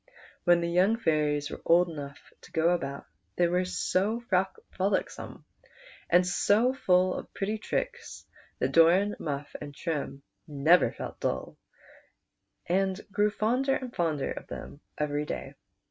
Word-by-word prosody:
Wlien 175 Hz, -1 st, +6 dB
the 170 Hz, -, -1 dB
young 185 Hz, +6 st, +3 dB
fairies 150 Hz, -7 st, 0 dB
were -, -, -7 dB
old 175 Hz, +1 st, +5 dB
enough 145 Hz, -4 st, -9 dB
to -, -, -16 dB
go 165 Hz, +1 st, +2 dB
about 140 Hz, -6 st, -2 dB, 0.3 s
they 175 Hz, -, +3 dB
were 180 Hz, +2 st, +1 dB
so 195 Hz, +4 st, 0 dB, 0.5 s
frolicsome 190 Hz, +1 st, -2 dB, 0.6 s
and 180 Hz, +1 st, +5 dB
so 210 Hz, +7 st, +3 dB
full 185 Hz, -7 st, +3 dB
of -, -, -7 dB
pretty 210 Hz, +2 st, -2 dB
tricks 485 Hz, -, -4 dB, 0.3 s
that -, -, 0 dB
Doran, 180 Hz, +5 st, +5 dB
Muff, 145 Hz, -1 st, -4 dB
and 145 Hz, -1 st, -8 dB
Trim 140 Hz, -4 st, -4 dB, 0.2 s
never 155 Hz, +5 st, +4 dB
felt -, -, -8 dB
dull, 65 Hz, 0 st, -2 dB, 1.1 s
and 190 Hz, +1 st, +1 dB
grew 205 Hz, +1 st, +2 dB
fonder 250 Hz, +6 st, +1 dB
and 250 Hz, -2 st, -6 dB
fonder 155 Hz, -5 st, 0 dB
of -, -, -7 dB
them 145 Hz, -, -8 dB, 0.2 s
every 150 Hz, 0 st, -1 dB
day. -, -, -5 dB
175 Hz, 140 wpm, -28 LUFS, 150-200 Hz, 1.1 s, Wlien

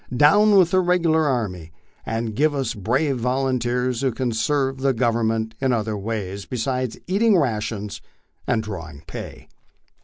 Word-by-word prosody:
Down 205 Hz, -, +6 dB
with 180 Hz, -2 st, +5 dB
the 185 Hz, -, +4 dB
regular 170 Hz, -3 st, +2 dB
army, 95 Hz, -, -2 dB, 0.4 s
and 115 Hz, -1 st, -2 dB
give 150 Hz, +3 st, +2 dB
us 135 Hz, -4 st, -1 dB
brave 130 Hz, +7 st, 0 dB
volunteers 125 Hz, -1 st, 0 dB
who 135 Hz, -2 st, +1 dB
can 125 Hz, +1 st, -2 dB
serve 135 Hz, +3 st, 0 dB
the 135 Hz, 0 st, +2 dB
Government 115 Hz, -1 st, 0 dB
in 135 Hz, -1 st, +2 dB
other 110 Hz, -2 st, -1 dB
ways 100 Hz, -2 st, -4 dB
be 125 Hz, -, -4 dB
sides 125 Hz, 0 st, -2 dB
eating 205 Hz, +2 st, +3 dB
rations 105 Hz, -, -2 dB, 0.5 s
and 115 Hz, -3 st, +1 dB
drawing 85 Hz, -8 st, -8 dB
pay." -, -, -8 dB
125 Hz, 150 wpm, -22 LUFS, 110-140 Hz, 0.5 s, Down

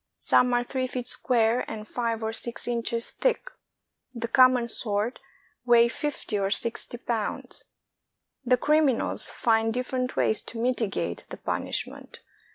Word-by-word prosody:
Some 250 Hz, 0 st, +3 dB
are 245 Hz, -, +2 dB
three 255 Hz, +1 st, -2 dB
feet 250 Hz, -1 st, -4 dB
square 240 Hz, -1 st, +3 dB
and 215 Hz, -1 st, -7 dB
five 230 Hz, -1 st, -2 dB
or 220 Hz, 0 st, -2 dB
six 235 Hz, +1 st, -5 dB
inches 235 Hz, -1 st, -2 dB
thick; -, -, -1 dB, 0.6 s
the 235 Hz, 0 st, -3 dB
common 255 Hz, 0 st, +5 dB
sort 215 Hz, 0 st, -2 dB, 0.4 s
weigh 235 Hz, -1 st, +6 dB
fifty 255 Hz, -6 st, -3 dB
or 195 Hz, 0 st, 0 dB
sixty 235 Hz, +3 st, -3 dB
pounds. 230 Hz, -3 st, -4 dB, 0.8 s
The 250 Hz, 0 st, +3 dB
criminals 295 Hz, -2 st, +2 dB
find 225 Hz, -1 st, +1 dB
different 250 Hz, +1 st, -2 dB
ways 220 Hz, -, +1 dB
to 230 Hz, -, -9 dB
mitigate 230 Hz, -4 st, -1 dB
the -, -, -7 dB
punishment. -, -, -4 dB
240 Hz, 135 wpm, -26 LUFS, 225-255 Hz, 0.8 s, weigh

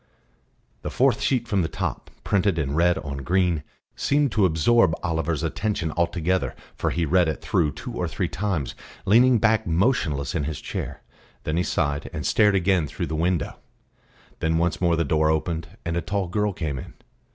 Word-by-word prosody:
The -, -, -4 dB
fourth -, -, +2 dB
sheet 125 Hz, -3 st, +1 dB
from 100 Hz, -3 st, +1 dB
the 80 Hz, -, 0 dB
top, -, -, -4 dB
printed 100 Hz, -3 st, +1 dB
in 70 Hz, -3 st, -1 dB
red 85 Hz, +2 st, +3 dB
on 70 Hz, -1 st, -5 dB
green, 85 Hz, +3 st, +1 dB, 0.3 s
seemed 145 Hz, -2 st, +1 dB
to 100 Hz, -2 st, +4 dB
absorb 90 Hz, +3 st, +3 dB
Oliver's 80 Hz, -2 st, -1 dB
attention 100 Hz, -7 st, -1 dB
altogether, 85 Hz, +2 st, 0 dB, 0.2 s
for -, -, -1 dB
he 85 Hz, -1 st, 0 dB
read 90 Hz, +2 st, +3 dB
it 80 Hz, -, -2 dB
through 80 Hz, -5 st, +1 dB
two -, -, -7 dB
or -, -, -2 dB
three -, -, -2 dB
times, 95 Hz, -8 st, -2 dB, 0.3 s
leaning 120 Hz, +5 st, +5 dB
back 110 Hz, -2 st, +2 dB
motionless 80 Hz, -, +1 dB
in 75 Hz, -5 st, -1 dB
his 75 Hz, -2 st, -4 dB
chair. -, -, -5 dB, 0.4 s
Then 75 Hz, -, -1 dB
he -, -, +3 dB
sighed, 70 Hz, -3 st, -1 dB
and 75 Hz, -, -5 dB
stared 105 Hz, -2 st, +4 dB
again 95 Hz, -4 st, +2 dB
through -, -, -4 dB
the -, -, 0 dB
window. 85 Hz, +1 st, -1 dB, 0.8 s
Then 80 Hz, 0 st, +1 dB
once 85 Hz, 0 st, 0 dB
more 85 Hz, -2 st, +3 dB
the 85 Hz, 0 st, 0 dB
door 75 Hz, +2 st, +2 dB
opened, 80 Hz, +1 st, -1 dB, 0.2 s
and 85 Hz, 0 st, -1 dB
a 85 Hz, -, 0 dB
tall 100 Hz, -1 st, -2 dB
girl 105 Hz, +3 st, 0 dB
came 75 Hz, -7 st, -3 dB
in. -, -, -10 dB
85 Hz, 185 wpm, -24 LUFS, 80-100 Hz, 0.8 s, leaning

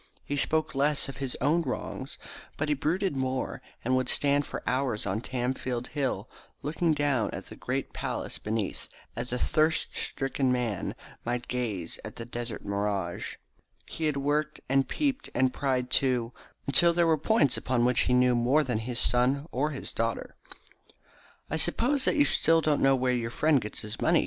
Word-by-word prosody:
He 145 Hz, -, -2 dB
spoke 155 Hz, +3 st, +1 dB
less 145 Hz, +2 st, +2 dB
of 135 Hz, -, -7 dB
his 135 Hz, -3 st, -3 dB
own 165 Hz, +4 st, +3 dB
wrongs, -, -, -4 dB, 0.4 s
but 150 Hz, +1 st, -1 dB
he -, -, +4 dB
brooded 165 Hz, +4 st, 0 dB
more, 130 Hz, -1 st, -2 dB, 0.2 s
and 130 Hz, +2 st, +2 dB
would 130 Hz, -1 st, +1 dB
stand 145 Hz, 0 st, +3 dB
for -, -, -6 dB
hours 130 Hz, -4 st, 0 dB
on 100 Hz, +2 st, -1 dB
Tamfield 125 Hz, -1 st, -2 dB
Hill 130 Hz, -7 st, -2 dB, 0.4 s
looking 160 Hz, +2 st, +1 dB
down 145 Hz, -6 st, +1 dB
at -, -, -6 dB
the -, -, -9 dB
great -, -, -3 dB
palace -, -, -3 dB
beneath, 110 Hz, -2 st, -3 dB, 0.3 s
as 120 Hz, +2 st, -4 dB
a 125 Hz, -, 0 dB
thirst 155 Hz, +4 st, +1 dB
stricken 135 Hz, -1 st, -1 dB
man 120 Hz, -6 st, -1 dB, 0.3 s
might 120 Hz, +1 st, -2 dB
gaze 110 Hz, -9 st, -2 dB
at -, -, -8 dB
the 115 Hz, -, -6 dB
desert 120 Hz, -1 st, -5 dB
mirage. 100 Hz, -3 st, -2 dB, 0.5 s
He 160 Hz, -, -4 dB
had 150 Hz, -2 st, +1 dB
worked, 150 Hz, +2 st, 0 dB
and 135 Hz, +1 st, +2 dB
peeped, 285 Hz, -2 st, -1 dB
and 130 Hz, 0 st, +3 dB
pried, 130 Hz, -3 st, -1 dB
too, 125 Hz, -3 st, +2 dB, 0.3 s
until 170 Hz, +5 st, +6 dB
there 170 Hz, 0 st, +3 dB
were 165 Hz, -1 st, +4 dB
points 150 Hz, -, +3 dB
upon 125 Hz, -2 st, +1 dB
which 125 Hz, 0 st, +4 dB
he -, -, +3 dB
knew 125 Hz, 0 st, +4 dB
more 125 Hz, +6 st, +3 dB
than 125 Hz, -5 st, -1 dB
either 110 Hz, -, -6 dB
his 125 Hz, -2 st, -1 dB
son 130 Hz, +4 st, +3 dB
or 145 Hz, +4 st, 0 dB
his 140 Hz, -3 st, -6 dB
daughter. 115 Hz, 0 st, -2 dB, 1.1 s
"I 160 Hz, -, -2 dB
suppose 250 Hz, -, +1 dB
that -, -, +2 dB
you 290 Hz, -2 st, +5 dB
still 165 Hz, -, +4 dB
don't 150 Hz, -2 st, +1 dB
know 135 Hz, 0 st, +5 dB
where 130 Hz, -1 st, +1 dB
your 115 Hz, -2 st, -1 dB
friend 150 Hz, +2 st, +3 dB
gets 105 Hz, -, -5 dB
his 105 Hz, 0 st, -6 dB
money?" -, -, +4 dB
130 Hz, 185 wpm, -28 LUFS, 120-150 Hz, 1.1 s, until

